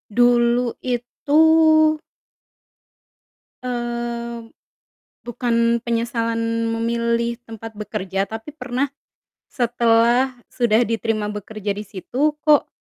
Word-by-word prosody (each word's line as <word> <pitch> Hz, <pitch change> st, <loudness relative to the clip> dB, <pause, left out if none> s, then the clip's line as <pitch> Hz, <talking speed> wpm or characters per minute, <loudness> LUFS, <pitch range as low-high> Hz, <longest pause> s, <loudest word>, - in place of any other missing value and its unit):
Dulu 240 Hz, 0 st, +3 dB
itu 250 Hz, +4 st, 0 dB, 2.7 s
mmm, 235 Hz, -1 st, -6 dB, 0.7 s
bukan 235 Hz, -1 st, +1 dB
penyesalan 230 Hz, -1 st, -1 dB
memilih 235 Hz, 0 st, 0 dB
tempat 225 Hz, -1 st, -9 dB
bekerja 195 Hz, -2 st, -3 dB
tapi 220 Hz, +7 st, -7 dB
pernah, 270 Hz, -2 st, -3 dB, 0.6 s
setelah 240 Hz, +1 st, +2 dB, 0.2 s
sudah 235 Hz, -2 st, +2 dB
diterima 225 Hz, -2 st, -1 dB
bekerja 210 Hz, 0 st, -5 dB
di 210 Hz, -, -5 dB
situ 260 Hz, +10 st, -1 dB
kok, 300 Hz, -1 st, +4 dB
235 Hz, 80 wpm, -21 LUFS, 225-245 Hz, 2.7 s, kok